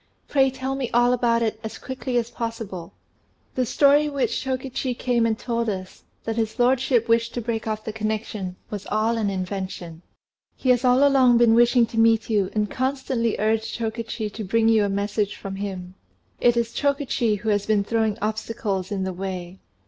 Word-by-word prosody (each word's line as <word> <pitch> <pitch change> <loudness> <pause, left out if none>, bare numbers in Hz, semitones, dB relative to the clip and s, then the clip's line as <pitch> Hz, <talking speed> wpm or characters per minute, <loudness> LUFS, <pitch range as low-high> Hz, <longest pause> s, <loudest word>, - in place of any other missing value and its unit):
Pray 270 -2 +3
tell 265 +1 -4
me 270 -3 -2
all 240 +1 +5
about 235 -1 +2
it 220 -1 -1
as 220 - -6
quickly 260 -1 -3
as 235 0 -1
possible." 225 -7 -5 0.6
"The 255 -2 0
story 290 +4 +4
which 280 -2 -1
Chokichi 260 -1 -3
came 240 -2 +1
and 220 -1 0
told 235 -1 -2
us, 185 -2 -6 0.2
that 225 0 -3
his 220 0 -1
lordship 250 -1 +2
wished 230 +1 +2
to - - -1
break 225 -1 -3
off 215 0 -2
the 220 - -4
connection, 215 -3 -3 0.2
was 205 -2 -5
all 220 +2 +1
an 210 -2 0
invention. 185 -3 -5 0.5
He 260 - -2
has 245 0 +2
all 255 +3 +5
along 260 -3 +5
been 235 -1 +5
wishing 240 +1 +5
to 225 0 -3
meet 225 0 +3
you, 200 -3 +2
and 210 -1 +1
constantly 260 -2 -1
urged 220 +1 0
Chokichi 225 -1 -3
to 220 - -5
bring 225 +3 +2
you 220 -2 +4
a - - -1
message 205 +1 -1
from 195 -1 -7
him. 185 -2 -5 0.5
It 240 -1 +3
is 230 0 0
Chokichi 275 -6 0
who 215 +2 -3
has 205 -1 +1
been 210 -2 +2
throwing 220 0 0
obstacles 215 -3 -2
in 195 -2 -1
the 190 0 -3
way. 185 0 -6
225 Hz, 185 wpm, -24 LUFS, 210-245 Hz, 0.6 s, all